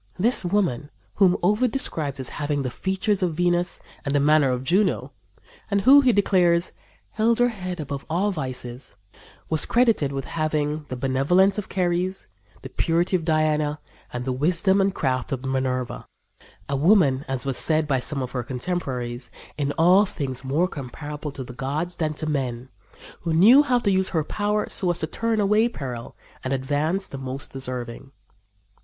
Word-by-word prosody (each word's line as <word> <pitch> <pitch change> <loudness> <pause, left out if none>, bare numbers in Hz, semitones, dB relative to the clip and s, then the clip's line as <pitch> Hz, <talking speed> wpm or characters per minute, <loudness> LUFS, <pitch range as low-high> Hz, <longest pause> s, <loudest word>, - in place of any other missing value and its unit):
This 225 +6 +4
woman, 175 -7 0 0.2
whom 185 -3 +4
Ovid 210 +7 +3
describes 150 - -2
as 130 - -2
having 145 -1 -2
the 130 - -3
features 190 - -1
of 175 -4 0
Venus 175 +1 0 0.2
and 140 -1 -1
the - - +4
manner 150 -1 +4
of 125 0 -2
Juno, 190 +8 +1 0.6
and 200 -1 +1
who, 275 +7 +7
he 260 -2 +4
declares, 180 -5 +2 0.4
"held 225 +1 +2
her 245 0 +3
head 185 -5 -6
above 140 -2 -5
all 190 +6 +1
vices," 130 - -6 0.5
was 160 -2 +3
credited 230 - +2
with 135 -1 -4
having 155 -1 -2
the 130 - -5
benevolence 145 - +2
of 205 - -6
Ceres, 180 - -1 0.3
the - - -7
purity 170 +3 0
of 175 - 0
Diana 155 -2 +1 0.3
and 125 0 -5
the 130 - -1
wisdom 180 +8 +2
and 195 0 +2
craft 130 0 -1
of 135 -1 -3
Minerva 130 -1 -2 0.6
"a 140 - -1
woman," 145 -4 +3
as 135 0 -2
was 135 -2 -1
said 155 -1 +2
by 135 -3 +1
one 135 +1 -2
of 125 - -6
her 125 - -2
contemporaries, 125 -3 -4 0.3
"in 145 -1 -1
all 180 +5 +5
things 130 -7 -4
more 145 +7 +1
comparable 150 0 -7
to 135 -1 -7
the 125 - -10
gods 150 +8 -3
than 155 -2 -1
to 155 - -4
men, 130 -4 -3 0.5
who 165 -1 -2
knew 220 - +7
how 255 -4 +2
to 215 -4 +1
use 190 0 +1
her 160 -3 0
power 210 +5 -1
so 185 - +1
as 175 - +1
to 160 - +1
turn 225 +7 -1
away 210 +3 +3
peril 125 - -7 0.3
and 130 - -2
advance 145 +8 -1
the 135 - -8
most 135 +1 -6
deserving." 130 0 -6
155 Hz, 175 wpm, -24 LUFS, 135-190 Hz, 0.6 s, who